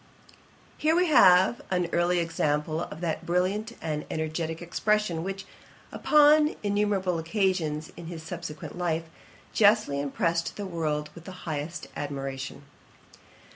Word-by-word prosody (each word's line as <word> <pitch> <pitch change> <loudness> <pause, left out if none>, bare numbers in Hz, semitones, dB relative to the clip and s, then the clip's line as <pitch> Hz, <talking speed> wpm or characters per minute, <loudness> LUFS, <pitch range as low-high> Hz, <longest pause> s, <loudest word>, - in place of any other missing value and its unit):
Here 315 +1 +3
we 360 +1 +4
have 190 -5 +6
an 180 -2 +1
early 175 +1 +2
example 155 -2 0
of 165 - -7
that 165 -3 -2
brilliant 190 +6 0
and 150 -2 -3
energetick 160 +1 -3
expression, 180 0 0
which, 195 +1 -5 0.5
upon 300 0 +5
innumerable 200 -4 +1
occasions 165 -4 -1
in 170 - -9
his 165 -2 -7
subsequent 165 -2 -7
life, 165 -2 0 0.5
justly 205 -9 +4
impressed 165 +4 -1
the 205 - -5
world 155 -4 -2
with 170 - -13
the 185 -1 -10
highest 155 +1 -4
admiration. 135 -1 -5
170 Hz, 125 wpm, -27 LUFS, 160-195 Hz, 0.5 s, have